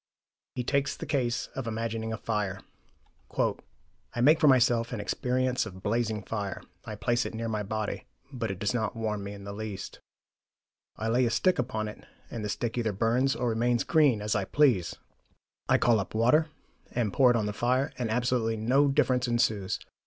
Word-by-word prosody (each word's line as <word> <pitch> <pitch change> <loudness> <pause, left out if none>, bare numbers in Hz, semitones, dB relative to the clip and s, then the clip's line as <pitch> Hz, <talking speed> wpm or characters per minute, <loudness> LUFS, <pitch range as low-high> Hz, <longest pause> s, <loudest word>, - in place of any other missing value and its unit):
He 125 - -2
takes 140 +2 0
the - - -6
case 125 -3 0
of 135 -3 -4
imagining 115 0 -3
a 110 - -3
fire. 105 -4 -2 0.8
"I - - -4
make 150 +6 +5
for 150 - +4
myself 120 -3 +4
an 120 - -3
experience 125 +3 0
of 95 -2 -11
blazing 110 -1 0
fire; 100 -4 -4 0.2
I 110 - -5
place 120 +4 +1
it - - -5
near 115 +1 -3
my 110 -2 -1
body; 105 +1 -3 0.3
but 115 -4 -3
it 95 - -3
does 105 +4 -1
not 110 -3 -1
warm 105 -2 -2
me 100 +1 -6
in 100 - -11
the 100 0 -6
least. 105 -2 -6 1.0
I 110 - -3
lay 120 +3 +3
a - - +1
stick 185 +8 +2
upon 110 -4 -2
it 105 - -9 0.3
and 115 - -5
the 105 - -3
stick 120 +3 -2
either 115 -2 0
burns 115 +6 +1
or 125 - -1
remains 120 +1 +1
green, 145 -10 +3
as 105 - 0
I 100 -2 0
please. 125 - +2 0.7
I - - +5
call 115 -2 +3
up 95 - -5
water, 125 +8 +3 0.4
and 115 -5 -1
pour 130 -2 +5
it 120 - +4
on 110 - 0
the 105 - -2
fire, 125 +5 +1
and 120 -3 -1
absolutely 120 -1 0
no 130 +6 +3
difference 130 -2 +2
ensues. 110 -5 +1
115 Hz, 190 wpm, -28 LUFS, 105-125 Hz, 1.0 s, make